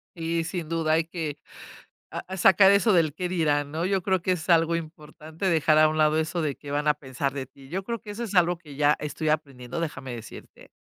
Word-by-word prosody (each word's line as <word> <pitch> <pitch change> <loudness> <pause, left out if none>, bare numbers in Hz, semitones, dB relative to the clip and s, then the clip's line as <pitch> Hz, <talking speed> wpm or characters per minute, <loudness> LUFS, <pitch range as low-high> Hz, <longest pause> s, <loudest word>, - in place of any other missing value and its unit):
Sí 165 0 -1
sin 170 -1 -4
duda 165 -1 0
hay 160 0 +2
que 160 -3 -5 0.7
ah, 190 +1 -6
sacar 195 +1 +6
eso 200 +2 +4
del 165 -5 +3
qué 180 -1 -3
dirán, 145 -5 +1
¿no? 165 +4 -2
Yo 195 -1 0
creo 190 0 +1
que 185 +1 0
es 170 0 -4
algo 165 0 +4
importante 155 +1 -7
dejar 155 -2 +3
a 155 0 +6
un 155 - -2
lado 155 0 +3
eso 160 +2 -1
de 145 -3 -1
qué 145 - -10
van 145 +1 -1
a 150 - +5
pensar 135 -1 -3
de 135 -2 -5
ti. 135 0 -17
Yo 190 +2 -2
creo 235 +3 -4
que 210 - -10
eso 235 +3 -4
es 205 - -6
algo 175 -1 +3
que 150 -5 -13
ya 145 +1 +4
estoy 150 +1 -2
aprendiendo, 135 -2 -3
déjame 150 -6 -5
decirte. 115 -2 -12
160 Hz, 230 wpm, -26 LUFS, 150-175 Hz, 0.7 s, sacar